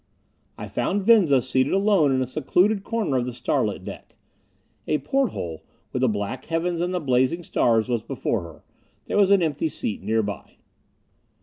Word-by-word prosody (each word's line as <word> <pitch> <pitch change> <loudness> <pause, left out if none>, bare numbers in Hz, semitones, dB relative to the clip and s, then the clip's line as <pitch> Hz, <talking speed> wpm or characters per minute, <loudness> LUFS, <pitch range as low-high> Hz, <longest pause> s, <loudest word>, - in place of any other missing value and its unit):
I - - -6
found 200 0 -1
Venza 185 - +5
seated 130 +1 +1
alone 195 -7 +3
in 130 -1 +1
a - - -2
secluded 180 - +1
corner 215 - -1
of 125 0 -1
the 125 - -4
starlit - - -1
deck. - - -10 0.7
A 150 - +2
porthole, 210 - -2 0.3
with 125 - -1
the 130 - +3
black 105 +4 -4
heavens 170 +1 -1
and 175 +1 -1
the 180 - -1
blazing 130 +3 +1
stars, 115 -7 +2
was 120 -3 -1
before 115 -3 -2
her. 85 -2 -12 0.4
There - - -2
was 200 -2 +5
an 200 -3 +5
empty 155 0 -1
seat 110 -7 -4
nearby. 110 -3 -2
140 Hz, 170 wpm, -24 LUFS, 120-185 Hz, 0.7 s, Venza